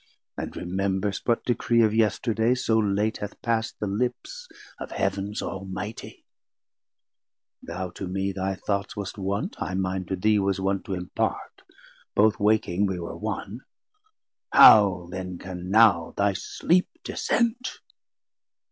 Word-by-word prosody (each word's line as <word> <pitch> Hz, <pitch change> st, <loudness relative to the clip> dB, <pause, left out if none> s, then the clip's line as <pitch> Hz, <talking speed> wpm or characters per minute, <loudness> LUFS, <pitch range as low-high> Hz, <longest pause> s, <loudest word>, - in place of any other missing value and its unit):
and -, -, -6 dB
remembrest 95 Hz, +2 st, -2 dB
what 120 Hz, -1 st, +1 dB
Decree 120 Hz, -1 st, +2 dB
Of 110 Hz, -1 st, +2 dB
yesterday, 115 Hz, +2 st, +2 dB
so 115 Hz, -3 st, +1 dB
late 105 Hz, +1 st, 0 dB
hath 105 Hz, -, -7 dB
past 115 Hz, -1 st, 0 dB
the -, -, -2 dB
lips 125 Hz, -, -3 dB, 0.3 s
Of -, -, -6 dB
Heav'ns 100 Hz, +2 st, -2 dB
Almightie. 95 Hz, +3 st, -6 dB, 1.4 s
Thou 90 Hz, +2 st, -5 dB
to 95 Hz, -, -6 dB
me 95 Hz, +2 st, -2 dB
thy 95 Hz, 0 st, -2 dB
thoughts 100 Hz, +2 st, -3 dB
Wast 100 Hz, 0 st, -6 dB
wont, 100 Hz, +2 st, -2 dB
I 95 Hz, -, -2 dB
mine 95 Hz, 0 st, -2 dB
to 95 Hz, -, -2 dB
thee 105 Hz, +3 st, +2 dB
was 95 Hz, -1 st, 0 dB
wont 95 Hz, 0 st, -1 dB
to 95 Hz, -, -3 dB
impart; 90 Hz, 0 st, -3 dB, 0.5 s
Both 110 Hz, +1 st, +4 dB
waking 105 Hz, -2 st, +2 dB
we 95 Hz, -2 st, -3 dB
were 85 Hz, -, -6 dB
one; 110 Hz, +5 st, -5 dB, 0.9 s
how 95 Hz, -5 st, +7 dB
then 90 Hz, -1 st, -5 dB
can 90 Hz, 0 st, -7 dB
now 100 Hz, -6 st, +4 dB
Thy 100 Hz, 0 st, +2 dB
sleep 175 Hz, -, +1 dB
dissent? 240 Hz, +2 st, -1 dB
100 Hz, 135 wpm, -25 LUFS, 95-110 Hz, 1.4 s, how